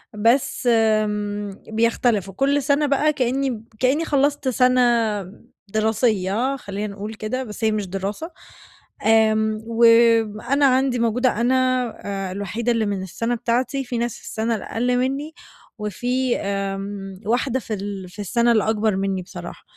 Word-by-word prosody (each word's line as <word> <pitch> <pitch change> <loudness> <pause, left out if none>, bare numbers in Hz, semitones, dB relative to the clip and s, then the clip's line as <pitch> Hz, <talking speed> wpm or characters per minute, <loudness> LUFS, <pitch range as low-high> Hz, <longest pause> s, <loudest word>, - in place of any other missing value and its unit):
بس 235 +3 +1
آمم 210 -2 0
بيختلف، 225 -2 +1
وكل 275 +8 +1
سنة 290 +1 +2
بقى 290 +2 +2
كأني 255 -3 -1 0.2
كأني 275 +6 +2
خلّصت 285 -1 +1
سنة 255 0 +3 0.9
دراسية 220 +3 +1
خلينا 205 -4 -5
نقول 210 +2 -6
كده، 220 +4 -3
بس 215 -1 -8
هي 220 - +3
مش 210 -3 -2
دراسة، 200 - -4 0.7
آمم 220 -1 +3
وأنا 230 +3 +4
عندي 260 -1 +2
موجودة 235 0 +1
أنا 255 +2 +3 0.7
آآ - - -6
الوحيدة 205 +5 -2
اللي 225 -2 +1
من 200 -2 -2
السنة 230 +6 -2
بتاعتي، 245 +3 -1
في 245 -1 -3
ناس 235 -1 -2
في - - -21
السنة 225 +1 -2
الأقل 245 +4 -1
مني، 275 +5 -2 0.5
وفي 245 +5 -1
آآ 195 0 -2 0.5
واحدة 255 +3 0
في 225 - -6
ال 195 -2 -5
في 210 - -15
السنة 235 +4 +2
الأكبر 215 -1 +2
مني 195 -1 -1
بصراحة، 180 - -9
230 Hz, 135 wpm, -22 LUFS, 210-255 Hz, 0.9 s, وأنا